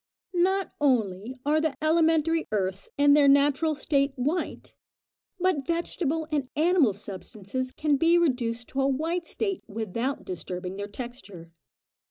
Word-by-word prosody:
Not 380 +2 +1
only 230 -4 +1
are 305 +2 +3
the 310 -3 0
elementary 325 0 +2
earths 195 -2 -2
in 285 0 +6
their 290 -1 +6
natural 285 +3 +4
state 275 -1 +1
white, 295 +7 -3 0.7
but 355 -7 +1
vegetable 325 -2 -1
and 280 -4 -1
animal 315 - +3
substances 205 +5 -6
can 295 0 +1
be 330 +4 +4
reduced 245 -7 0
to 270 - -1
a 270 - +3
white 325 +5 -1
state 395 -4 -2
without 225 +5 -3
disturbing 180 +1 -5
their 205 0 -4
texture. 205 -7 -9
275 Hz, 135 wpm, -27 LUFS, 220-320 Hz, 0.7 s, in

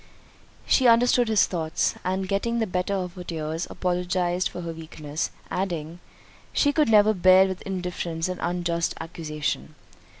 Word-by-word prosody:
She 260 - +4
understood 240 +1 +5
his 220 -3 +4
thoughts, 160 -3 -1
and 190 +1 -1
getting 215 +5 0
the 225 - +1
better 180 +1 -1
of 180 -2 -3
her 180 -1 -8
tears, 160 0 -4
apologised 180 0 0
for 180 - -7
her 165 -1 -5
weakness; 155 -2 -5 0.2
adding, 170 -3 -3 0.5
"She 290 -1 +3
could 300 -4 +3
never 215 0 +6
bear 185 0 +6
with 190 -1 -4
indifference 180 -3 -3
an 185 -1 -4
unjust 170 -1 -1
accusation." 155 -2 -4
180 Hz, 145 wpm, -25 LUFS, 165-195 Hz, 0.5 s, never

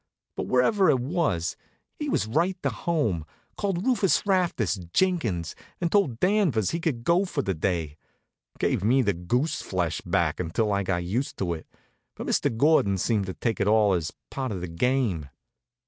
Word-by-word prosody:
But - - -3
wherever 185 - +3
it 130 - +4
was, 130 - -1 0.4
he 300 -1 -2
was - - +1
right 170 +11 0
to - - +1
home 130 - -1 0.3
called 195 -2 -2
Rufus 235 -8 +2
Rastus 170 - +1
Jenkins, 120 - +1 0.3
and 170 -2 -1
told 175 - +2
Danvers 180 - +2
he 170 - -2
could 145 -9 -2
go 170 +7 +3
for 165 -7 -2
the 95 - 0
day. 80 -3 -2 0.6
Gave - - 0
me 130 +5 +4
the 100 -3 +2
goose 120 - -1
flesh 90 -4 -2
back - - 0
until 100 +5 0
I 100 - +1
got 90 -2 -1
used 115 +10 -2
to 90 -3 -1
it; 80 - -8 0.5
but - - -6
Mr. 115 - 0
Gordon 115 -8 +4
seemed 100 0 0
to 95 - -5
take 115 -2 -2
it 100 - +1
all 105 -2 +4
as 85 -4 -1 0.2
part 130 -3 -3
of 95 -4 -4
the 90 - -4
game. 90 - 0
115 Hz, 180 wpm, -26 LUFS, -, 0.6 s, it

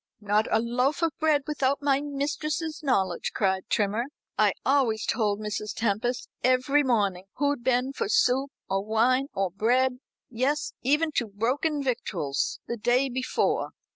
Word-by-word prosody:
"Not 210 +1 +1
a - - +3
loaf 250 +7 0
of 330 - +3
bread 310 -2 +3
without 280 -2 0
my 280 -1 +3
mistress's 300 +3 -3
knowledge," 190 - 0
cried 190 0 0
Trimmer. 215 +2 +1 0.3
"I - - +3
always 255 -6 +2
told 210 -3 0
Mrs. 210 0 -4
Tempest 235 +3 -1 0.2
every 255 +3 +3
morning 205 -8 +1
who'd 285 -3 0
been 255 +2 +1
for 200 - -2
soup, 260 +4 +3 0.2
or 195 0 -1
wine, 240 +5 +2
or 195 -2 0
bread 250 +6 +1 0.3
yes, 260 +5 -1
even 300 +5 +2
to 235 - +1
broken 270 +9 -1
victuals 180 - -2
the 235 - -3
day 250 +5 +2
before. 255 +1 -1
250 Hz, 145 wpm, -27 LUFS, 215-280 Hz, 0.3 s, a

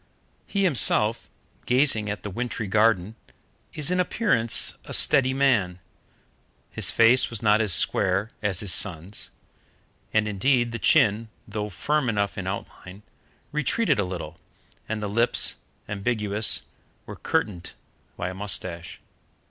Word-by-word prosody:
He 200 -1 -1
himself, 115 - +2 0.4
gazing 125 -5 +1
at 105 - -5
the 105 - -6
wintry 115 +1 -4
garden, 105 -1 +1 0.6
is 155 +3 -1
in 180 - 0
appearance 180 - +3
a - - +2
steady 135 -3 +4
man. 125 -10 +1 0.9
His - - 0
face 120 +3 +4
was 115 -3 -5
not 105 0 +3
as 105 -3 +2
square 95 +5 +2
as 100 -3 -1
his 100 -4 +3
son's, 95 +1 -1 0.8
and, 110 0 +1
indeed, 120 +4 0
the 115 - -5
chin, 110 +2 +2 0.2
though 105 0 -5
firm 145 +6 -1
enough 100 -2 -1
in 95 -1 -6
outline, 95 0 -8 0.5
retreated 150 - 0
a - - +2
little, 85 -3 -7 0.5
and 110 -1 -4
the - - -2
lips, 115 +4 +1 0.3
ambiguous, 105 0 0 0.4
were - - -9
curtained 90 -5 -3 0.4
by 90 - -3
a - - -7
moustache. 90 -3 -2
105 Hz, 130 wpm, -24 LUFS, 100-120 Hz, 0.9 s, steady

